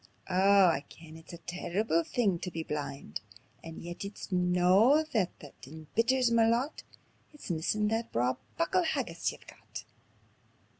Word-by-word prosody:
Oh 195 +1 +6
I 160 -5 +2
ken 160 -1 -13
it's 160 0 -13
a 170 - -8
terrible 175 +1 -1
thing 200 -6 0
tae 180 - -4
be 165 -1 -4
blind; 145 - -5 0.4
And 165 0 -9
yet 175 +2 -6
it's 200 0 -8
no 180 - +4
that 205 -6 0
that 145 - -11
embitters 230 - 0
ma 230 -1 +4
lot 240 +6 0 0.5
It's 295 -10 -7
missin' 190 +6 0
that 225 +1 -2
braw 125 +2 +1 0.2
muckle 335 +2 +2
haggis 330 - -1
ye've - - -14
got." - - -10
180 Hz, 150 wpm, -30 LUFS, 165-225 Hz, 0.5 s, Oh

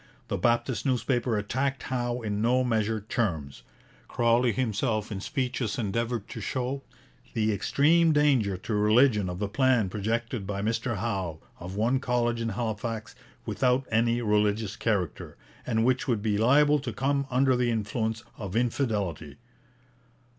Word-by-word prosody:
The - - -1
Baptist 120 +4 +1
newspaper 125 -3 0
attacked 130 +6 -1
Howe 120 -2 -2
in 105 -1 -2
no 125 +3 +3
measured 110 -3 -1
terms. 80 - -2 0.5
Crawley 120 +1 +2
himself 110 -1 -1
in 100 - -3
public - - -6
speeches 130 -6 -2
endeavoured 115 0 -2
to 115 - -6
show 130 +5 -2 0.5
'the 110 -1 +2
extreme 160 - +3
danger 135 -10 +3
to 105 +4 -5
religion 105 -1 +4
of 90 - -4
the 105 +2 -2
plan 120 -2 +2
projected 110 +1 -2
by 100 -1 -3
Mr 115 +1 -1
Howe 95 -6 -2 0.2
of 90 +2 -7
one 120 +5 +2
college 120 -2 0
in 115 - -1
Halifax 110 0 -3 0.3
without 125 0 +1
any 115 +2 +2
religious 105 0 +1
character, 100 -9 -2 0.3
and 115 -2 +1
which 130 +2 +1
would 115 -5 0
be 105 -2 +1
liable 145 +5 +5
to 130 -3 -4
come 140 +4 0
under 130 +1 +3
the 125 -1 +1
influence 110 0 -2 0.2
of 100 -2 -5
infidelity.' 105 - -1
115 Hz, 145 wpm, -27 LUFS, 105-125 Hz, 0.5 s, liable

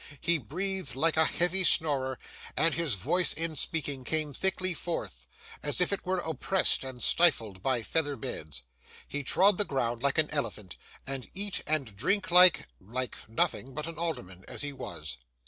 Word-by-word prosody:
He 170 -1 0
breathed 185 - -3
like 160 +4 +1
a 160 0 +4
heavy 180 +4 +1
snorer, 135 -6 +3 0.4
and 165 0 +2
his 160 -9 +2
voice 175 - +3
in 165 -1 -4
speaking 145 -3 0
came 155 +1 -2
thickly 185 +2 0
forth, 105 - -6 0.3
as 145 - +1
if 180 +2 +3
it 195 - -1
were 185 0 0
oppressed 175 +2 +2
and 130 -2 -6
stifled 115 - +3
by 130 -1 -1
feather 145 +5 -1
beds. 75 - -6 0.4
He 145 - -4
trod 190 +8 +3
the - - +8
ground 120 - -3
like 140 +2 0
an 155 -1 +1
elephant, 110 - -4 0.3
and 135 -2 -5
eat 200 0 0
and 140 -9 -2
drank 185 - 0
like—like 130 - +4
nothing 125 +3 -1
but 150 0 -4
an 165 -1 -8
alderman, 110 - -5
as - - -3
he 145 -1 -5
was. - - -7
150 Hz, 165 wpm, -28 LUFS, 125-170 Hz, 0.4 s, the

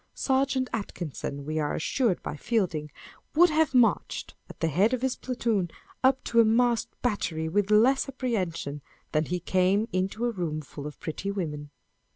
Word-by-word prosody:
Serjeant 265 -1 +1
Atkinson, 155 - -4
we 155 +1 -2
are 150 -1 -1
assured 225 - 0
by - - -4
Fielding, 165 -6 -1 0.5
would 350 +1 +6
have 310 -3 +2
marched, 245 -2 +2 0.2
at - - -12
the 165 - +1
head 200 - +3
of 255 - -7
his 265 -1 +1
platoon, 230 -8 -1 0.3
up 260 0 +4
to 235 - +2
a - - +9
masked 235 +1 +2
battery 170 -9 -1
with 200 +4 +1
less 250 +6 +4
apprehension 185 - -2 0.3
than 155 0 +1
lie 180 - +1
came 185 +4 +2
into 190 +5 -1
a 240 - +1
room 170 -7 -3
full 145 0 -8
of 150 - -10
pretty 165 +5 -4
women. 150 -7 -4
200 Hz, 170 wpm, -27 LUFS, 160-245 Hz, 0.5 s, a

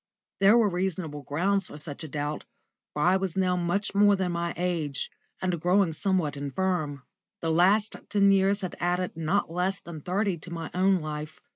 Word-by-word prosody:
There 200 +4 +6
were 230 -3 +4
reasonable 180 -5 -2
grounds 180 +7 0
for - - -10
such 150 0 -7
a - - -5
doubt, 145 +1 -4 0.5
for 150 - -2
I 185 +2 +5
was 190 -2 -3
now 185 -1 +2
much 180 +4 -1
more 205 0 +5
than 190 -2 -1
my 170 0 -1
age, 165 -6 -1 0.3
and 180 -3 -1
growing 180 -1 +3
somewhat 175 -4 0
infirm. 145 0 -2 0.4
The 165 - 0
last 195 +6 +3
ten 200 -1 +4
years 195 +1 +3
had 185 - -4
added 180 +1 -1
not 165 +3 0
less 180 +3 -1
than 165 -3 -9
thirty 190 +1 -1
to 170 - -11
my 165 -1 -5
own 185 0 +3
life. 155 0 -6
180 Hz, 180 wpm, -27 LUFS, 160-195 Hz, 0.5 s, There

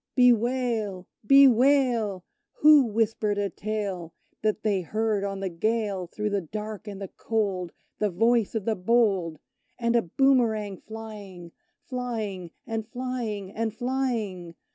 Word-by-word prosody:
Bewail! 235 -5 +2 0.2
bewail! 250 -6 +4 0.3
Who 300 -2 +6
whispered 215 -1 0
a 200 -2 -1
tale, 195 -5 -4 0.3
That 215 0 0
they 205 -3 +1
heard 215 +2 -1
on 195 -1 -3
the 195 - -1
gale, 200 0 -1
Through 210 +4 -3
the 200 -1 0
dark 210 +5 -7
and 200 -2 -6
the 195 - -5
cold, 195 -6 -2 0.3
The 210 - +1
voice 225 +4 +2
of 215 -3 -2
the 225 - +1
bold; 195 -5 +1 0.4
And 235 -1 0
a 235 - +5
boomerang 220 -2 +2
flying; 205 -6 -9 0.3
Flying, 220 -8 -4 0.2
and 225 -2 -4
flying, 235 -6 -4
and 225 +1 -3
flying? 230 -9 -2
215 Hz, 130 wpm, -26 LUFS, 195-235 Hz, 0.4 s, Who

